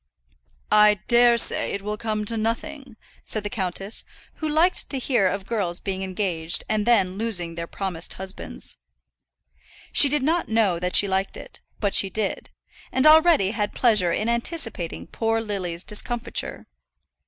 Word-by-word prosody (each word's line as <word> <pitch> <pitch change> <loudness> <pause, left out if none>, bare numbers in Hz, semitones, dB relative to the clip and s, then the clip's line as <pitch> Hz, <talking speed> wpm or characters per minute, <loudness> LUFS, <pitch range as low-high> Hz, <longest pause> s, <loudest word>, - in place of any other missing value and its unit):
"I 210 0 +6
dare 240 0 +5
say - - -1
it 200 - -4
will 210 +1 -3
come 215 -1 -3
to 230 - -3
nothing," 240 +3 -4 0.3
said 215 - -1
the 205 - -4
countess, 195 -1 -3 0.3
who 310 - -3
liked 330 +4 +2
to 275 - -1
hear 245 -6 +1
of 190 +1 -3
girls 195 -7 -2
being 190 -1 -4
engaged 180 -4 0
and 215 0 -1
then 195 -5 +2
losing 180 -7 -1
their 170 0 -6
promised 180 -4 -4
husbands. 190 +1 -8 1.2
She 285 - +7
did 295 -1 +1
not 330 +4 0
know 215 -6 +2
that 180 +1 -1
she 200 - +5
liked 190 0 -1
it, - - -12 0.2
but 200 -2 -1
she 195 - +4
did; 200 +1 -3 0.4
and 260 - +2
already 315 - +6
had 210 -2 -3
pleasure 210 -8 +4
in 215 - -1
anticipating 235 - -2
poor 225 0 -1
Lily's 190 -5 -4
discomfiture. 235 +3 -3
210 Hz, 155 wpm, -23 LUFS, 190-235 Hz, 1.2 s, She